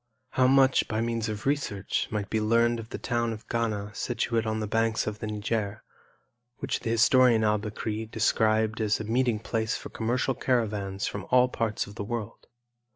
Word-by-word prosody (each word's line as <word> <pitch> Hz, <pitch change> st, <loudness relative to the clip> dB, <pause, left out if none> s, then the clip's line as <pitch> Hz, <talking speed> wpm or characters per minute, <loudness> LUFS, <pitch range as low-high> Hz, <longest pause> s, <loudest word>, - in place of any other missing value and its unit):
How 130 Hz, -1 st, +3 dB
much, 135 Hz, 0 st, +4 dB
by 110 Hz, -, -2 dB
means 115 Hz, -1 st, -1 dB
of 105 Hz, -1 st, -5 dB
research, 135 Hz, -9 st, -1 dB
might 105 Hz, -2 st, -2 dB
be 110 Hz, -, +1 dB
learned 115 Hz, +2 st, +3 dB
of 115 Hz, 0 st, -8 dB
the -, -, -5 dB
town 120 Hz, -2 st, -1 dB
of 110 Hz, -, -11 dB
Ghana 105 Hz, -3 st, -2 dB
situate 115 Hz, 0 st, -1 dB
on 110 Hz, 0 st, -1 dB
the 110 Hz, -, -2 dB
banks 115 Hz, +1 st, +1 dB
of 105 Hz, 0 st, -4 dB
the 110 Hz, -, -4 dB
Niger, 105 Hz, 0 st, -2 dB, 0.7 s
which 135 Hz, -1 st, -2 dB
the -, -, -4 dB
historian 115 Hz, 0 st, +5 dB
Al 105 Hz, 0 st, +2 dB
Bekri 110 Hz, +1 st, -4 dB
described 110 Hz, 0 st, +1 dB
as 105 Hz, -1 st, +1 dB
a -, -, -3 dB
meeting 120 Hz, +1 st, +1 dB
place 110 Hz, 0 st, -1 dB
for -, -, -9 dB
commercial 125 Hz, +4 st, 0 dB
caravans 105 Hz, -6 st, -1 dB
from 100 Hz, -2 st, -5 dB
all 125 Hz, 0 st, +5 dB
parts 110 Hz, -3 st, -1 dB
of 100 Hz, -, -11 dB
the -, -, -3 dB
world? 115 Hz, 0 st, -5 dB
110 Hz, 185 wpm, -27 LUFS, 105-120 Hz, 0.7 s, historian